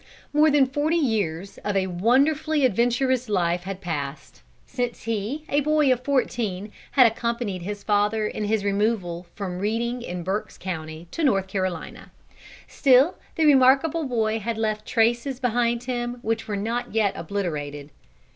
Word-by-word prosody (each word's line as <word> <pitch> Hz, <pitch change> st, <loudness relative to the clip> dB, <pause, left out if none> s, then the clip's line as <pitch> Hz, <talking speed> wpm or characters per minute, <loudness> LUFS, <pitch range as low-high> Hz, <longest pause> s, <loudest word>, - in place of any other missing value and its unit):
More 305 Hz, +1 st, +5 dB
than 285 Hz, -2 st, +5 dB
forty 290 Hz, +5 st, 0 dB
years 200 Hz, -, -1 dB
of 205 Hz, -1 st, -1 dB
a 190 Hz, -, +2 dB
wonderfully 275 Hz, -, +2 dB
adventurous 245 Hz, +2 st, +1 dB
life 175 Hz, -3 st, 0 dB
had 195 Hz, 0 st, -5 dB
passed, 145 Hz, -5 st, -5 dB, 0.2 s
since 245 Hz, -2 st, -4 dB
he 230 Hz, +7 st, -3 dB
a 285 Hz, -, +2 dB
boy 300 Hz, -2 st, +3 dB
of 250 Hz, 0 st, -6 dB
fourteen 225 Hz, -7 st, -1 dB, 0.2 s
had 260 Hz, -3 st, +7 dB
accompanied 230 Hz, -4 st, -1 dB
his 205 Hz, +3 st, -6 dB
father 210 Hz, +1 st, +1 dB
in 210 Hz, 0 st, -3 dB
his 210 Hz, -1 st, 0 dB
removal 200 Hz, -4 st, -1 dB
from 185 Hz, -3 st, -4 dB
Reading, 235 Hz, +4 st, -1 dB
in 180 Hz, -6 st, -5 dB
Berk's 205 Hz, +4 st, -3 dB
County, 160 Hz, -2 st, -6 dB
to 335 Hz, -, -3 dB
North 195 Hz, -9 st, +3 dB
Carolina. 185 Hz, -3 st, -4 dB, 0.6 s
Still 270 Hz, +4 st, +4 dB, 0.2 s
the 320 Hz, -, +2 dB
remarkable 280 Hz, +3 st, +4 dB
boy 225 Hz, -3 st, 0 dB
had 225 Hz, +1 st, -3 dB
left 215 Hz, -1 st, -2 dB
traces 240 Hz, +3 st, +1 dB
behind 240 Hz, -1 st, 0 dB
him 245 Hz, -1 st, -3 dB
which 225 Hz, +1 st, -2 dB
were 205 Hz, -2 st, -2 dB
not 230 Hz, +3 st, -3 dB
yet 210 Hz, -3 st, +2 dB
obliterated. 150 Hz, -6 st, -4 dB
220 Hz, 150 wpm, -24 LUFS, 195-255 Hz, 0.6 s, had